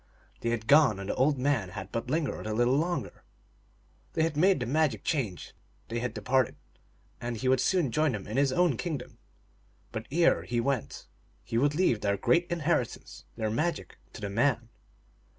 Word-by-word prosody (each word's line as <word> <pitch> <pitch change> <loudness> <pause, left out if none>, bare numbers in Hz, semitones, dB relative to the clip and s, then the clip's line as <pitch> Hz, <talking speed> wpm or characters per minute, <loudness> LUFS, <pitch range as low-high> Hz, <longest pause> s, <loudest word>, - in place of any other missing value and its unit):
They 115 - -2
had 115 -2 -2
gone, 140 -6 +5
and 100 +1 -6
the - - -3
old 140 +2 +2
man 125 -7 0
had 95 +1 -8
but 115 +1 -3
lingered 150 -6 -1
a 110 - -2
little 120 +3 +3
longer. 170 +4 -2 0.9
They 160 - +1
had 160 -2 0
made 185 +2 +4
the 120 - -2
magic 150 +4 +1
change, 115 - -2 0.4
they 115 +1 -2
had 120 -1 -3
departed, 130 -2 +1 0.7
and 120 -1 -3
he 130 +4 -2
would 130 -1 +3
soon 175 -9 +1
join 155 +2 +2
them 105 -3 -5
in 105 - -7
Ms 135 +1 +2
own 170 -4 +2
kingdom. 155 -8 -5 0.7
But 110 0 -5
ere 170 +3 +3
he 120 -1 -2
went 130 0 -2 0.4
he 115 - -1
would 145 +3 +2
leave 155 - +2
their 100 -1 +1
great 170 - +2
inheritance, 155 -7 -2
their 110 -2 -2
magic, 155 +8 -2
to - - -10
the 100 - -3
man. 115 +1 +1
130 Hz, 185 wpm, -29 LUFS, 115-155 Hz, 0.9 s, gone